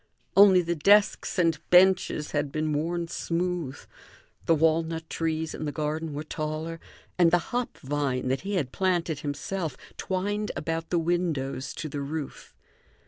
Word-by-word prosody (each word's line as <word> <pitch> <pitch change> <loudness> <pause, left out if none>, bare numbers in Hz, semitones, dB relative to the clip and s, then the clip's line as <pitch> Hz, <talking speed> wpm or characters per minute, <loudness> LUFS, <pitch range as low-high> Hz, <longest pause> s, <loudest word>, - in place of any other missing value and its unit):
Only 195 -2 +7
the 170 +1 -1
desks 200 +8 +3
and 165 -4 +2
benches 180 -4 +4
had 145 -2 -1
been 155 0 -1
worn 170 +3 -1
smooth; 170 -4 -2 0.7
the 165 - +5
walnut 160 +1 +1
trees 160 -1 -2
in 155 - -5
the 145 - -2
garden 155 +2 -3
were 150 - -3
taller, 155 +2 -4 0.4
and 170 -2 +6
the 175 +1 0
hop 245 0 -2
vine, 135 -2 -2
that 130 - 0
he 200 +2 -3
had 140 -9 -1
planted 175 -5 0
himself 150 +1 -4 0.2
twined 205 +3 -2
about 165 0 -3
the 175 - +1
windows 165 -6 -1
to 160 - -4
the 145 -1 -4
roof. 145 0 -6
165 Hz, 150 wpm, -27 LUFS, 150-175 Hz, 0.7 s, Only